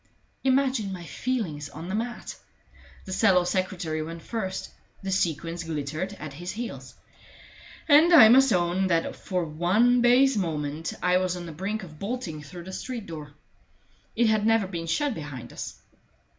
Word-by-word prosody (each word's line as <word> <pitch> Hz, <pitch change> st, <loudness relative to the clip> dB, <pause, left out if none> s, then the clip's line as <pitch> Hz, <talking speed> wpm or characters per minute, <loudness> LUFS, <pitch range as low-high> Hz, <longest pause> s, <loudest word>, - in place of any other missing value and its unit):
Imagine 260 Hz, -6 st, +2 dB
my 180 Hz, -2 st, -7 dB
feelings 165 Hz, -, -3 dB
on 160 Hz, +4 st, -8 dB
the 190 Hz, -, -4 dB
mat! 235 Hz, +3 st, -4 dB, 0.7 s
The 190 Hz, -, -5 dB
sallow 190 Hz, -3 st, +4 dB
secretary 180 Hz, -3 st, -2 dB
went 165 Hz, +1 st, -7 dB
first; 190 Hz, -5 st, -4 dB, 0.3 s
the 195 Hz, -, -3 dB
sequins 170 Hz, -2 st, -1 dB
glittered 155 Hz, +4 st, -3 dB
at 150 Hz, -6 st, -8 dB
his 175 Hz, +5 st, -6 dB
heels, 230 Hz, +3 st, -7 dB, 0.9 s
and 310 Hz, +3 st, +7 dB
I 290 Hz, -10 st, +10 dB
must 265 Hz, +2 st, +6 dB
own 180 Hz, +1 st, +2 dB
that 165 Hz, -2 st, 0 dB
for 180 Hz, -3 st, -2 dB
one 190 Hz, +11 st, +3 dB
base 255 Hz, +3 st, +5 dB
moment 155 Hz, -4 st, -2 dB
I 180 Hz, 0 st, +4 dB
was 185 Hz, -1 st, 0 dB
on 175 Hz, -, -7 dB
the 165 Hz, -, -7 dB
brink 195 Hz, +6 st, -3 dB
of 155 Hz, -4 st, -12 dB
bolting 200 Hz, -8 st, -4 dB
through 175 Hz, +4 st, -10 dB
the 190 Hz, +2 st, -9 dB
street 240 Hz, 0 st, -5 dB
door. 150 Hz, -4 st, -8 dB, 0.8 s
It 235 Hz, -, +3 dB
had 215 Hz, -1 st, +3 dB
never 225 Hz, -1 st, +3 dB
been 170 Hz, -3 st, -5 dB
shut 285 Hz, -, 0 dB
behind 140 Hz, -, -8 dB
us. -, -, -7 dB
185 Hz, 160 wpm, -26 LUFS, 165-225 Hz, 0.9 s, I